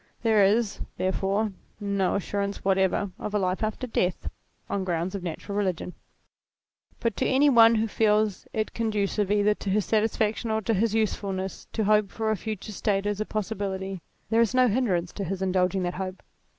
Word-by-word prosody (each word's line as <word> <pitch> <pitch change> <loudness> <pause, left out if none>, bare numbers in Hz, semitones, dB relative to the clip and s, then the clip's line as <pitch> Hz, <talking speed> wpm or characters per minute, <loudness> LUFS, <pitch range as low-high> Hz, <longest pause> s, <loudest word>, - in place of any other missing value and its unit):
There 220 -3 +5
is, 210 +2 +2 0.2
therefore, 195 +3 0 0.3
no 200 -2 0
assurance 200 0 -3
whatever 190 0 +2
of 210 - -4
a - - +4
life 185 -1 0
after 215 +4 -2
death, 185 -6 -1 0.4
on 200 - -1
grounds 175 0 -1
of 200 - -4
natural 180 +3 -5
religion. 185 -3 -1 1.1
But 230 -3 -1
to 260 - +1
any 280 +2 +4
one 230 -2 +7
who 220 +1 +1
feels 210 -2 +1
it 215 -1 -2
conducive 210 -3 0
either 205 0 +3
to 205 - -6
his 205 +1 +1
satisfaction 220 +1 0
or 220 0 0
to 225 - +1
his 220 +2 +1
usefulness 195 -3 -2
to 220 - 0
hope 210 -1 +3
for 220 -1 -1
a - - +2
future 215 0 -5
state 200 0 0
as 205 0 -1
a - - -1
possibility, 195 -3 -3 0.3
there 225 +1 +4
is 230 +2 +1
no 255 0 +5
hindrance 195 -7 0
to 200 - -4
his 190 +1 -3
indulging 185 0 +1
that 175 0 -1
hope. 185 0 -5
205 Hz, 180 wpm, -26 LUFS, 190-220 Hz, 1.1 s, one